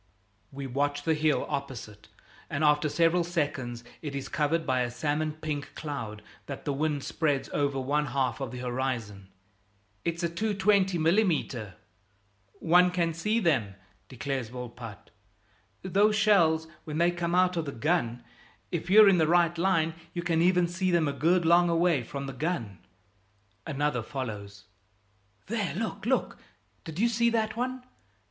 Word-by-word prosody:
We 140 0 -6
watch 145 +2 -1
the 160 - +2
hill 155 -1 +1
opposite, 115 -6 -6 0.4
and 140 +2 -2
after 150 0 +3
several 170 +3 +3
seconds 145 -8 -2 0.2
it 145 -3 -5
is 140 - -5
covered 160 +2 0
by 130 -1 +1
a 120 - 0
salmon 150 +5 -1
pink 150 -2 -5
cloud 115 -9 -5 0.2
that 140 - -7
the 145 - 0
wind 145 0 -1
spreads 145 -4 -1
over 140 -2 0
one 145 +3 0
half 135 +1 -1
of 135 - -3
the 125 - -7
horizon. 120 -6 -3 0.8
"It's 170 +1 -2
a - - +3
220 195 0 +1
mm." 160 - +1 0.8
"One 180 +2 +4
can 170 -2 0
see 210 +8 0
them," 130 - +1 0.3
declares 130 -2 -3
Volpatte, 120 -4 -9 0.7
"those 205 +3 +3
shells, 170 -7 +4 0.2
when 155 -1 -5
they 170 +1 +3
come 175 0 -2
out 180 0 +3
of 165 -2 -1
the 140 - -4
gun. 120 -4 -1 0.5
If 175 0 -3
you're 210 +2 +8
in 190 -3 +5
the 160 - +3
right 170 0 +3
line, 165 -2 +1 0.2
you 175 - -2
can 165 -2 +1
even 180 0 +4
see 185 +2 -1
them 170 -3 +2
a 140 - -1
good 165 +5 +2
long 175 +1 +5
away 170 -4 +2
from 140 +4 -6
the 135 - -6
gun." 125 - -3 0.9
Another 145 -4 0
follows: 105 -6 -6 0.8
"There! 205 -4 -2
Look, 220 +2 -4
look! 260 - 0 0.5
Did 160 -2 -7
you 225 +5 +3
see 235 0 +2
that 220 -2 0
one? 255 +1 -3
155 Hz, 155 wpm, -28 LUFS, 135-175 Hz, 0.9 s, you're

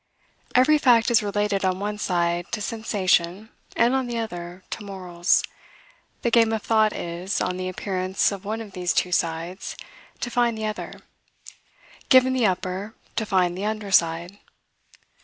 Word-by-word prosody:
Every 295 +5 +5
fact 240 -3 +4
is 235 - +5
related 205 -1 -1
on 185 0 +1
one 210 +1 -3
side 175 -2 0
to 230 - -1
sensation 205 -2 0 0.3
and, 235 +2 +3
on 265 -1 0
the 240 -1 -3
other, 180 -4 -6
to 215 - -5
morals. 185 -3 0 0.8
The 235 - +1
game 230 -1 +5
of 220 - -2
thought 220 -1 +3
is, 175 +3 -3
on 180 - -1
the 185 0 -3
appearance 185 0 0
of 200 -1 -6
one 220 +2 -3
of 215 -3 -9
these 180 -3 -1
two 180 - +1
sides, 170 +2 -2 0.4
to 240 - -3
find 235 -1 +1
the 220 - -3
other; 215 0 -5 1.1
given 260 0 +6
the 250 -4 +3
upper, 185 +3 -3 0.2
to 220 - -1
find 180 -3 +2
the 195 +3 -4
under 215 -2 -3
side. 170 +2 +2
200 Hz, 160 wpm, -24 LUFS, 180-225 Hz, 1.1 s, given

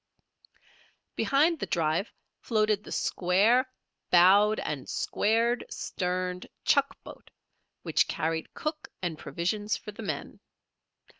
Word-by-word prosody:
Behind 310 +4 +2
the - - -3
drive 165 +4 0 0.3
floated 215 -2 +1
the - - -11
square 210 +9 +2 0.4
bowed 200 +5 +6
and 140 -4 -4
square 230 +3 +1
sterned 180 0 -3 0.2
chuck - - +2
boat, - - -13 0.5
which - - +2
carried 160 +1 -2
cook 305 0 -4 0.2
and 165 -3 -3
provisions 205 +7 -2
for 210 - -9
the 210 - -10
men. 205 - -5
205 Hz, 105 wpm, -28 LUFS, 180-225 Hz, 0.5 s, bowed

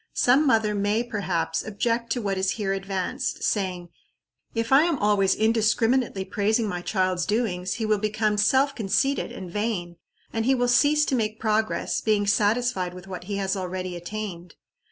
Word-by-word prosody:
Some 270 +5 +4
mother 220 -4 +3
may, 205 +3 0
perhaps, 190 -8 -2
object 230 +2 -1
to 245 - -3
what 200 -1 -1
is 190 0 0
here 200 -3 -2
advanced, 195 -1 -3
saying, 185 -4 -1 0.7
"If 230 +1 -2
I 270 +2 +7
am 340 -4 0
always 205 -3 +2
indiscriminately 225 -1 +1
praising 215 +3 0
my 180 -3 -3
child's 185 -2 0
doings, 190 -4 -1
he 225 - -2
will 215 -1 +1
become 215 0 0
self 265 +6 +3
conceited 235 +6 0
and 185 -2 -8
vain, 190 -5 -3 0.4
and 225 0 -1
he 265 +1 +4
will 245 -1 +1
cease 295 +4 +4
to 265 - 0
make 215 -2 -2
progress, 220 0 0
being 210 -2 +1
satisfied 205 -2 +1
with 180 0 -10
what 185 -2 -8
he 200 +1 -4
has 195 0 -1
already 185 -1 -4
attained." 175 -1 -6
210 Hz, 170 wpm, -25 LUFS, 190-230 Hz, 0.7 s, I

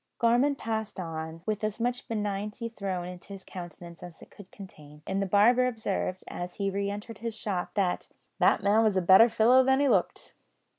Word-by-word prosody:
Gorman 245 +5 +3
passed 220 -4 -4
on, 165 -1 -6
with 215 0 -2
as 215 +1 -2
much 245 +1 -2
benignity 210 +1 -3
thrown 190 -5 -4
into 180 +2 -9
his 195 -1 -10
countenance 175 -2 -10
as 175 -2 -10
it - - -17
could 200 -2 -15
contain; 150 -6 -13
and 195 +1 -2
the 195 - -1
barber 235 +6 +4
observed, 200 -5 -3
as 175 0 -6
he 195 -1 -1
re 200 +1 -2
entered 205 +2 -7
his 230 -1 -4
shop, 190 -5 -4
that, 190 -3 0 0.3
"that - - +3
man 210 +3 +4
was 210 -3 +2
a - - +3
better 190 +7 +7
fellow 245 +4 +5
than 265 +1 +3
he 285 - +3
looked." 200 -8 0
200 Hz, 195 wpm, -28 LUFS, 185-225 Hz, 0.3 s, better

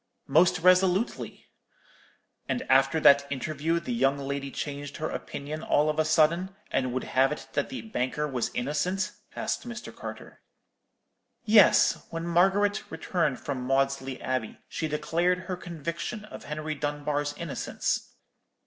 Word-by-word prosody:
"'Most 165 +6 +4
resolutely.' 185 +4 +2 1.0
"'And 245 - -1
after 135 +4 +4
that 140 -2 +6
interview 155 +4 -1
the 205 +9 -4
young 140 -12 +2
lady 140 0 -3
changed 145 0 -5
her 155 - -3
opinion 150 +2 -5
all 150 0 +2
of 155 - -4
a 155 - +3
sudden, 170 +5 +2 0.2
and 130 -1 0
would 130 +1 -2
have 135 +1 +2
it 150 - -5
that - - 0
the 260 - -6
banker 150 - -2
was 130 -4 -1
innocent?' 175 +9 -1 0.2
asked - - -3
Mr. 240 0 -7
Carter. - - -9 1.0
"'Yes; 210 -3 +6
when 165 0 -4
Margaret 195 +4 +3
returned 165 -8 -1
from 135 -3 -4
Maudesley 135 0 0
Abbey 130 -4 -3
she 160 - -3
declared 170 +4 0
her 185 0 -4
conviction 170 +5 -5
of - - -10
Henry 155 +1 -3
Dunbar's 145 0 -2
innocence.' 170 -4 -2
155 Hz, 140 wpm, -28 LUFS, 140-180 Hz, 1.0 s, that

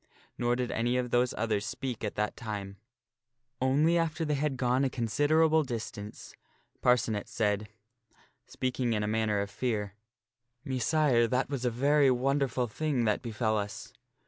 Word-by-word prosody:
Nor 120 0 +1
did 125 0 -2
any 120 +2 0
of 125 -1 -2
those 125 0 +3
others 110 -2 0
speak 120 +2 -4
at 105 - -3
that 105 0 -1
time; 100 -3 -6 0.8
only 150 +6 +3
after 165 0 -1
they 150 - 0
had 145 -1 -1
gone 125 +1 +2
a 135 - +2
considerable 155 +7 +2
distance 110 -5 -6 0.5
Parcenet 115 -4 +2
said, 105 -1 0 0.8
speaking 125 -2 -1
in 105 -1 0
a - - -1
manner 105 -1 +1
of 100 0 -4
fear, 105 -6 -2 0.4
" 125 +1 -48
Messire, 130 -2 +2
that 130 +3 0
was 130 -3 -2
a - - +3
very 140 +4 +3
wonderful 130 0 +1
thing 135 +1 -1
that 105 -1 +1
befell 110 -2 0
us." 100 +1 -6
125 Hz, 155 wpm, -30 LUFS, 110-135 Hz, 0.8 s, those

